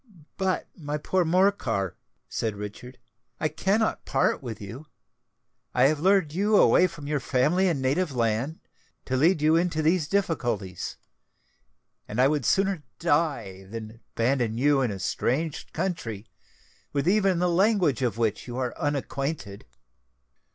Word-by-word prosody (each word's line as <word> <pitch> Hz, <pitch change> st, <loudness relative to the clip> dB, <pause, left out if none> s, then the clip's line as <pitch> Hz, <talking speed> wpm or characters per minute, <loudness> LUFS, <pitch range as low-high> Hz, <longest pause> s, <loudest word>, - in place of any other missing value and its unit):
"But, 190 Hz, -1 st, -1 dB
my 150 Hz, -3 st, -4 dB
poor 185 Hz, +4 st, +1 dB
Morcar," 160 Hz, -, +1 dB, 0.3 s
said 110 Hz, -3 st, -2 dB
Richard, 105 Hz, +5 st, -8 dB, 0.4 s
"I 155 Hz, -, +1 dB
cannot 195 Hz, +8 st, 0 dB
part 135 Hz, -, +1 dB
with 115 Hz, -5 st, -6 dB
you. 115 Hz, +10 st, -9 dB, 0.9 s
I -, -, +4 dB
have 150 Hz, +2 st, +3 dB
lured 185 Hz, -3 st, +3 dB
you 205 Hz, +4 st, +3 dB
away 185 Hz, -, +6 dB
from 165 Hz, -5 st, -10 dB
your 145 Hz, 0 st, 0 dB
family 150 Hz, +9 st, +2 dB
and 150 Hz, -7 st, 0 dB
native 150 Hz, +6 st, +1 dB
land, 120 Hz, +5 st, -1 dB, 0.4 s
to 130 Hz, -, -1 dB
lead 155 Hz, +4 st, +3 dB
you 155 Hz, +1 st, +5 dB
into 165 Hz, -2 st, +1 dB
these 160 Hz, -1 st, +2 dB
difficulties; 120 Hz, -, -2 dB, 1.1 s
and 110 Hz, -, -4 dB
I 130 Hz, -, +6 dB
would 145 Hz, -3 st, 0 dB
sooner 195 Hz, -3 st, +2 dB, 0.2 s
die 140 Hz, -, 0 dB
than 110 Hz, +1 st, -8 dB
abandon 115 Hz, -2 st, +1 dB
you 140 Hz, +2 st, +3 dB
in 125 Hz, -, +1 dB
a 100 Hz, -, -4 dB
strange 145 Hz, -, -2 dB
country, 155 Hz, -, -3 dB, 0.7 s
with 140 Hz, +2 st, 0 dB
even 195 Hz, -2 st, +3 dB
the 180 Hz, +1 st, +2 dB
language 180 Hz, -, +2 dB
of 120 Hz, -4 st, 0 dB
which 115 Hz, -1 st, -1 dB
you 120 Hz, 0 st, -5 dB
are 125 Hz, -2 st, -2 dB
unacquainted." 140 Hz, -6 st, -3 dB
145 Hz, 145 wpm, -26 LUFS, 120-175 Hz, 1.1 s, away